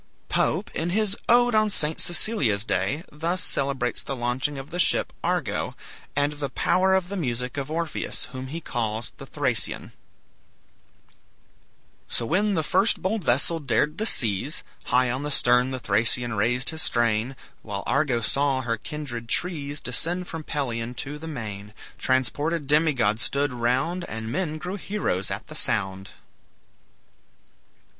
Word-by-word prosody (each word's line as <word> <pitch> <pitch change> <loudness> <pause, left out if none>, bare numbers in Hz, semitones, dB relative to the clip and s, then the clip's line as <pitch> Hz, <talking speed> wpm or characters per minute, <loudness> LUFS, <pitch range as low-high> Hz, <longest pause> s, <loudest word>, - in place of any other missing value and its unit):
Pope, - - +1
in 165 +2 -1
his 205 +1 +3
"Ode 245 0 +5
on 215 0 +4
St. 155 -5 0
Cecilia's 145 - +2
Day," 120 - -1
thus 165 +4 -1
celebrates 135 -3 +1
the 135 - -4
launching 125 +4 -1
of 135 +3 -8
the 175 - -4
ship - - +3
"Argo," - - -1 0.4
and 145 +1 +2
the 145 -2 -3
power 190 +8 +3
of 185 -1 0
the 200 - -4
music 125 -7 -2
of 140 0 -3
Orpheus, 165 0 -1
whom 130 0 -6
he 160 +5 -4
calls 110 -4 -3
the - - -9
Thracian: - - +1 2.2
"So 115 - -2
when 205 - +2
the 160 - +1
first 195 +7 +3
bold 200 +1 0
vessel 145 +5 +2
dared 150 - +1
the 220 - +2
seas, 115 - +1 0.2
High 125 -1 +3
on 130 +2 -2
the 145 - -3
stern 125 -2 +4
the 130 - -3
Thracian 115 +2 +3
raised 120 +6 +1
his 160 0 -1
strain, 120 +2 +1 0.3
While 100 -2 -4
Argo 135 -4 +1
saw 135 +3 +1
her 115 -2 -1
kindred 120 -3 -6
trees 145 -4 -1
Descend 170 +8 -2
from 160 -1 -6
Pelion 120 -5 -3
to 145 +6 -4
the 160 - -7
main. 105 -8 -6 0.2
Transported 145 +5 +1
demigods 135 -8 +2
stood 140 0 +1
round, 130 +9 0
And 110 0 -5
men 155 -1 -1
grew 180 +5 -4
heroes 190 - -1
at - - -3
the - - -10
sound." 95 +1 0
140 Hz, 150 wpm, -25 LUFS, 120-165 Hz, 2.2 s, Ode